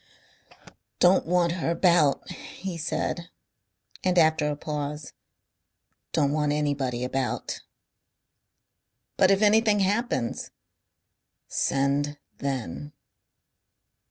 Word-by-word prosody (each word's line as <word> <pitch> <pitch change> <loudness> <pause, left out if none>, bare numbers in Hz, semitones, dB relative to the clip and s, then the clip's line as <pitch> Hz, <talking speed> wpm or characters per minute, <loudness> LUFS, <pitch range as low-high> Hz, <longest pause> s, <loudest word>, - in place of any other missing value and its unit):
"Don't 180 -1 +4
want 175 -1 +2
her 170 -1 -2
about," 170 -4 +3
he 190 -2 -7
said, 170 +1 -3 0.7
and 185 -1 +1
after 160 -2 +4
a 145 - -2
pause, 150 -1 -5 1.0
"Don't 145 -3 +2
want 150 -1 +1
anybody 140 -5 -1
about." 130 +1 -2 1.5
"But 185 - +4
if 195 +2 +3
anything 210 -1 +4
happens 195 - -1 0.5
?" - - -55 0.2
"Send 140 +2 0 0.2
then." 135 - -4
150 Hz, 90 wpm, -26 LUFS, 140-180 Hz, 1.5 s, Don't